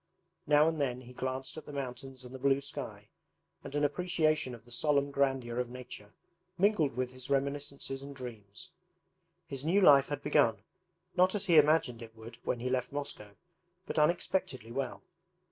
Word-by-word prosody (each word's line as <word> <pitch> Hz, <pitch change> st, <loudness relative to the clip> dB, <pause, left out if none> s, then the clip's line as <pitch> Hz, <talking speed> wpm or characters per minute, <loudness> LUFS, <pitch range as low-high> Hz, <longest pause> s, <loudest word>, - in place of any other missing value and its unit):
Now 150 Hz, +1 st, +6 dB
and 160 Hz, -2 st, 0 dB
then 125 Hz, -2 st, -1 dB
he 125 Hz, 0 st, -12 dB
glanced 130 Hz, +3 st, -4 dB
at 155 Hz, -, -9 dB
the -, -, -7 dB
mountains 135 Hz, -1 st, -6 dB
and 125 Hz, -, -10 dB
the 130 Hz, -, -7 dB
blue 135 Hz, +1 st, +3 dB
sky, 140 Hz, -, -6 dB, 0.5 s
and 140 Hz, +1 st, -7 dB
an 145 Hz, -, +1 dB
appreciation 155 Hz, -4 st, +1 dB
of 115 Hz, -, -16 dB
the 120 Hz, -, -16 dB
solemn 140 Hz, +2 st, +2 dB
grandeur 135 Hz, -4 st, 0 dB
of 125 Hz, -1 st, -1 dB
nature 125 Hz, -4 st, -10 dB, 0.4 s
mingled 185 Hz, -, +3 dB
with 130 Hz, -1 st, -1 dB
his 130 Hz, 0 st, -7 dB
reminiscences 140 Hz, -1 st, -1 dB
and 140 Hz, 0 st, -8 dB
dreams. 110 Hz, -6 st, -9 dB, 0.7 s
His 135 Hz, -1 st, -4 dB
new 175 Hz, +6 st, +3 dB
life 140 Hz, -7 st, +7 dB
had 145 Hz, -1 st, -4 dB
begun, 120 Hz, -9 st, +3 dB, 0.5 s
not 185 Hz, +2 st, +4 dB
as 205 Hz, -, 0 dB
he 165 Hz, -3 st, +7 dB
imagined 150 Hz, -6 st, +3 dB
it 115 Hz, -1 st, -10 dB
would 115 Hz, +1 st, -11 dB
when 120 Hz, -, -1 dB
he 125 Hz, -, -1 dB
left 130 Hz, -1 st, -1 dB
Moscow, 135 Hz, -8 st, -5 dB, 0.5 s
but -, -, -1 dB
unexpectedly 150 Hz, -, 0 dB
well. 135 Hz, +1 st, -3 dB
135 Hz, 175 wpm, -32 LUFS, 125-145 Hz, 0.7 s, life